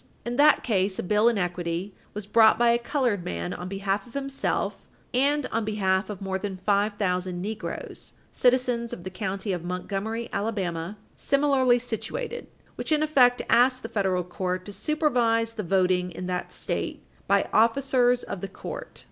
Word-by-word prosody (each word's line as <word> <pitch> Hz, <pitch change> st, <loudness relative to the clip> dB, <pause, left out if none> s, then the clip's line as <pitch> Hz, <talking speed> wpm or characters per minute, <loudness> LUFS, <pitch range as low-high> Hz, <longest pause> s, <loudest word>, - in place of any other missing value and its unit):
475. 240 Hz, -, -3 dB
In -, -, -4 dB
that 300 Hz, +1 st, +5 dB
case, 195 Hz, -4 st, +1 dB
a -, -, -2 dB
bill 210 Hz, +5 st, +4 dB
in 235 Hz, -, 0 dB
equity 175 Hz, +1 st, -2 dB, 0.2 s
was 210 Hz, -1 st, -4 dB
brought 220 Hz, +1 st, +5 dB
by 240 Hz, 0 st, +4 dB
a 235 Hz, -, +2 dB
colored 240 Hz, -, 0 dB
man 85 Hz, -, -3 dB
on 180 Hz, -, -6 dB
behalf 195 Hz, +1 st, -2 dB
of 240 Hz, -, -17 dB
himself 275 Hz, -1 st, -2 dB, 0.3 s
"and 280 Hz, +3 st, +2 dB
on 225 Hz, 0 st, 0 dB
behalf 195 Hz, -2 st, 0 dB
of 200 Hz, -2 st, -6 dB
more 190 Hz, 0 st, -2 dB
than 195 Hz, -1 st, -4 dB
five 205 Hz, +2 st, +1 dB
thousand 180 Hz, -2 st, -1 dB
negroes, 215 Hz, +3 st, -6 dB, 0.2 s
citizens 245 Hz, -2 st, +1 dB
of 175 Hz, -, -7 dB
the 185 Hz, -, -6 dB
county 195 Hz, +1 st, -3 dB
of 175 Hz, -2 st, -4 dB
Montgomery, 200 Hz, +6 st, -3 dB
Alabama, 195 Hz, -3 st, -2 dB, 0.2 s
similarly 275 Hz, -3 st, +3 dB
situated" 470 Hz, -, -4 dB, 0.3 s
which, -, -, -4 dB
in 305 Hz, 0 st, +3 dB
effect, 255 Hz, -5 st, +4 dB
asked 255 Hz, +2 st, +4 dB
the 225 Hz, -, -5 dB
federal 190 Hz, -3 st, 0 dB
court 180 Hz, +1 st, -3 dB
"to 205 Hz, -, -8 dB
supervise 240 Hz, -6 st, +1 dB
the 220 Hz, -, -4 dB
voting 180 Hz, -1 st, +2 dB
in 180 Hz, +2 st, -6 dB
that 180 Hz, 0 st, -3 dB
State -, -, -4 dB, 0.2 s
by -, -, +3 dB
officers 245 Hz, +1 st, +3 dB
of 190 Hz, -, -6 dB
the 195 Hz, -, -3 dB
court." -, -, -8 dB
210 Hz, 175 wpm, -26 LUFS, 185-245 Hz, 0.3 s, that